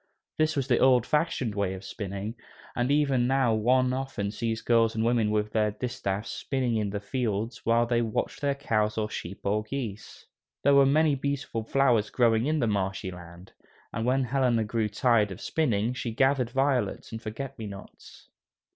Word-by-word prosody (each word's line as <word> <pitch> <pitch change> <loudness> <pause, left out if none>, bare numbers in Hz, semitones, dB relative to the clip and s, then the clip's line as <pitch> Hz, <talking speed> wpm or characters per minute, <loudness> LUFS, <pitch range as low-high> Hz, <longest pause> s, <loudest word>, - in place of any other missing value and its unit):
This 155 0 +2
was 135 -2 -1
the 120 -4 +3
old 125 -3 +5
fashioned 150 -7 0
way 100 -2 -1
of 95 - -10
spinning, 100 +1 -5 0.4
and 120 +1 0
even 140 -4 +2
now 130 -3 +2
one 125 +4 +2
often 130 -6 -3
sees 115 0 -2
girls 115 -2 +3
and 110 - 0
women 115 -2 +2
with 105 0 0
their 105 -1 +2
distaffs 105 -4 -3
spinning 130 -4 -1
in 105 -2 -1
the 100 +1 -3
fields 110 0 -3
while 115 +1 +4
they 120 0 +1
watch 110 -2 -2
their 140 -1 0
cows 110 -6 0
or 110 0 -1
sheep 95 +3 -6
or 105 +2 +1
geese. 110 -2 -6 0.4
There 140 - +5
were 140 -1 +6
many 155 +2 +3
beautiful 140 -4 -2
flowers 120 -4 +2
growing 115 0 +2
in 155 +1 +1
the - - +2
marshy 95 -3 -1
land, 90 +1 -12 0.4
and 115 - -2
when 130 +3 +2
Helena 125 -2 +1
grew 110 0 -1
tired 110 0 +2
of 95 - -7
spinning, 120 -6 0
she 125 -2 -4
gathered 130 +1 +2
violets 135 0 0
and 110 0 -6
forget 125 +4 -6
me 110 - -5
nots. 100 -1 -12
115 Hz, 180 wpm, -27 LUFS, 105-130 Hz, 0.4 s, were